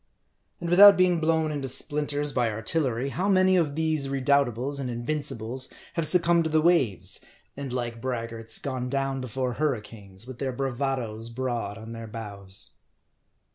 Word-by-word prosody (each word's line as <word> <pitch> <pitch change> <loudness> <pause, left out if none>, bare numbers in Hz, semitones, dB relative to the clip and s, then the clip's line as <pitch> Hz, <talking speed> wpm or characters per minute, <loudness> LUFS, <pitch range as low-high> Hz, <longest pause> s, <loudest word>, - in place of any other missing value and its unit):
^ - - -46 0.6
And 175 - -4
without 200 +3 +9
being 180 -2 +3
blown 160 -1 +1
into 140 -3 -3
splinters 145 +2 0
by 120 -3 +1
artillery, 125 +3 -1
how 185 +8 -1
many 185 -1 +4
of 155 -5 +1
these 155 -3 0
Redoubtables 140 -1 +1
and 130 -2 -3
Invincibles 130 -1 -2 0.2
have 165 -2 0
succumb 170 -1 +4
ed 165 - +1
to - - 0
the 155 0 +3
waves, 155 - +2 0.3
and 140 -2 -5
like 120 -2 -3
braggarts 115 -3 -4
gone 130 -2 -4
down 135 0 -1
before 125 0 -3
hurri 140 -8 0
canes, 100 -2 -10
with 130 -1 -9
their 135 -2 -2
bravadoes 125 -4 -2
broad 120 -4 -3
on 110 +1 -9
their 115 0 -7
bows. 100 -3 -5
135 Hz, 165 wpm, -26 LUFS, 115-155 Hz, 0.6 s, without